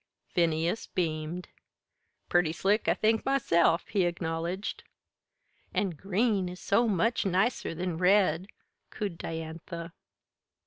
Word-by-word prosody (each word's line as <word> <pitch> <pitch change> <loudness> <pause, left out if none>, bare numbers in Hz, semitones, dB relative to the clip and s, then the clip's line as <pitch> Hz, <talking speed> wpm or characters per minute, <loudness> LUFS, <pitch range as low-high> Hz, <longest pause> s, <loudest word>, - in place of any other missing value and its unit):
Phineas 170 +3 +1
beamed. 165 0 -3 0.8
"Purty 175 -3 +3
slick, 200 +5 +1
I - - +4
think 220 0 +2
myself," 170 -11 +2
he 195 -4 +2
acknowledged. 170 +2 -3 0.9
"An' 195 - +1
green 195 +3 0
is 180 +1 -8
so 230 +4 +2
much 220 +3 +1
nicer 195 -1 0
than 175 -1 -3
red," 185 -1 +3 0.4
cooed 195 -5 -4
Diantha. 165 +1 -6
180 Hz, 105 wpm, -29 LUFS, 165-200 Hz, 0.9 s, I